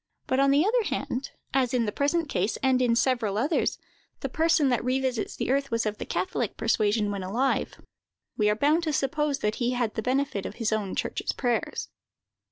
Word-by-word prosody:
But, 260 Hz, -, 0 dB
on 275 Hz, 0 st, +4 dB
the 285 Hz, +5 st, +4 dB
other 475 Hz, +4 st, +3 dB
hand, 265 Hz, -7 st, -3 dB, 0.2 s
as 255 Hz, -2 st, +2 dB
in 235 Hz, -2 st, +2 dB
the 210 Hz, -, -1 dB
present 310 Hz, +7 st, 0 dB
case, 205 Hz, -5 st, -1 dB
and 260 Hz, -1 st, +3 dB
in 240 Hz, -2 st, +3 dB
several 235 Hz, -5 st, +1 dB
others, 280 Hz, +9 st, +1 dB, 0.4 s
the -, -, -2 dB
person 320 Hz, -3 st, +3 dB
that 245 Hz, -2 st, +1 dB
revisits 255 Hz, -2 st, -1 dB
the -, -, -1 dB
earth 275 Hz, 0 st, +1 dB
was 230 Hz, -1 st, 0 dB
of 215 Hz, 0 st, -2 dB
the -, -, -5 dB
catholic 185 Hz, +5 st, -2 dB
persuasion 215 Hz, -2 st, +1 dB
when 200 Hz, -1 st, -3 dB
alive, 235 Hz, +9 st, 0 dB, 0.6 s
we 210 Hz, -1 st, +2 dB
are 210 Hz, -, +2 dB
bound 295 Hz, +8 st, +3 dB
to 310 Hz, -, 0 dB
suppose 285 Hz, +1 st, 0 dB
that 210 Hz, -, 0 dB
he 245 Hz, +1 st, +1 dB
had 240 Hz, -3 st, -1 dB
the -, -, -2 dB
benefit 255 Hz, -4 st, 0 dB
of -, -, -9 dB
his 225 Hz, -2 st, -1 dB
own 205 Hz, -3 st, -2 dB
church's -, -, -2 dB
prayers. 245 Hz, -3 st, -1 dB
250 Hz, 200 wpm, -27 LUFS, 215-275 Hz, 0.6 s, on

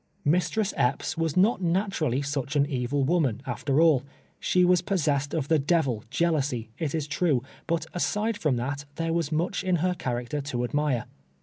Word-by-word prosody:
Mistress 180 Hz, +7 st, +1 dB
Epps 125 Hz, +5 st, 0 dB
was 165 Hz, 0 st, -1 dB
not 195 Hz, +2 st, +4 dB
naturally 170 Hz, -, 0 dB
such 140 Hz, 0 st, -3 dB
an 140 Hz, -1 st, +4 dB
evil 135 Hz, 0 st, -1 dB
wo 170 Hz, +6 st, +2 dB
man, 125 Hz, -8 st, 0 dB
after 140 Hz, -1 st, 0 dB
all. 160 Hz, -6 st, +5 dB, 0.4 s
She 180 Hz, -1 st, +3 dB
was 180 Hz, -1 st, +4 dB
possessed 145 Hz, -7 st, 0 dB
of 145 Hz, -4 st, -1 dB
the 160 Hz, 0 st, +3 dB
devil, 135 Hz, -7 st, +1 dB
jeal 170 Hz, 0 st, +2 dB
ousy, 130 Hz, -7 st, -1 dB
it 160 Hz, -2 st, -1 dB
is 155 Hz, -3 st, -1 dB
true, 150 Hz, -4 st, +1 dB, 0.2 s
but 170 Hz, -1 st, 0 dB
aside 210 Hz, +5 st, 0 dB
from 150 Hz, -5 st, +1 dB
that, 140 Hz, +4 st, -3 dB
there 165 Hz, 0 st, -1 dB
was 165 Hz, -3 st, -1 dB
much 170 Hz, +6 st, -1 dB
in 185 Hz, -1 st, +2 dB
her 180 Hz, +2 st, +1 dB
character 125 Hz, -3 st, -3 dB
to 125 Hz, -4 st, -3 dB
admire. 140 Hz, -1 st, 0 dB
150 Hz, 185 wpm, -27 LUFS, 135-175 Hz, 0.4 s, all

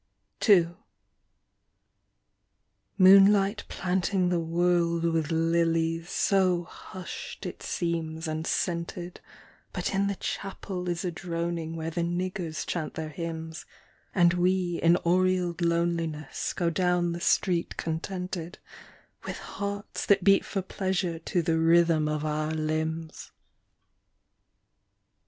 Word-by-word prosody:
II. 175 Hz, -5 st, +7 dB, 2.3 s
Moonlight 195 Hz, +2 st, +6 dB
planting 185 Hz, 0 st, 0 dB
the 175 Hz, -1 st, +1 dB
world 170 Hz, 0 st, +1 dB
with 165 Hz, -2 st, +1 dB
lilies, 165 Hz, 0 st, +1 dB
so 185 Hz, -3 st, +2 dB
hushed 180 Hz, +1 st, -9 dB
it -, -, -6 dB
seems 165 Hz, -1 st, -2 dB
and 155 Hz, +1 st, -3 dB
scented, 175 Hz, 0 st, -2 dB, 0.5 s
But -, -, -3 dB
in 195 Hz, +1 st, +2 dB
the 200 Hz, -, -1 dB
chapel 185 Hz, -1 st, -4 dB
is 175 Hz, +1 st, -2 dB
a 180 Hz, -, -1 dB
droning 170 Hz, -1 st, -3 dB
where 165 Hz, 0 st, -4 dB
the 170 Hz, -, -2 dB
niggers 175 Hz, -1 st, -2 dB
chant 165 Hz, -3 st, -3 dB
their 160 Hz, -1 st, -4 dB
hymns 160 Hz, 0 st, -6 dB, 0.5 s
And 175 Hz, -2 st, +5 dB
we 180 Hz, -1 st, +1 dB
in 170 Hz, +1 st, +5 dB
aureoled 180 Hz, -1 st, +2 dB
loneliness 170 Hz, -3 st, -1 dB
go 170 Hz, -2 st, 0 dB
down 180 Hz, 0 st, +1 dB
the 170 Hz, +1 st, -5 dB
street 175 Hz, -1 st, +1 dB
contented, 180 Hz, +1 st, -4 dB, 0.7 s
With -, -, -4 dB
hearts 200 Hz, 0 st, -5 dB
that 195 Hz, -2 st, +4 dB
beat 195 Hz, 0 st, +5 dB
for 195 Hz, -2 st, -3 dB
pleasure 185 Hz, -3 st, -2 dB
to 170 Hz, +1 st, -1 dB
the 160 Hz, 0 st, +1 dB
rhythm 165 Hz, -1 st, +4 dB
of 150 Hz, 0 st, -2 dB
our 155 Hz, 0 st, -1 dB
limbs. 160 Hz, +1 st, -3 dB
170 Hz, 115 wpm, -28 LUFS, 165-180 Hz, 2.3 s, II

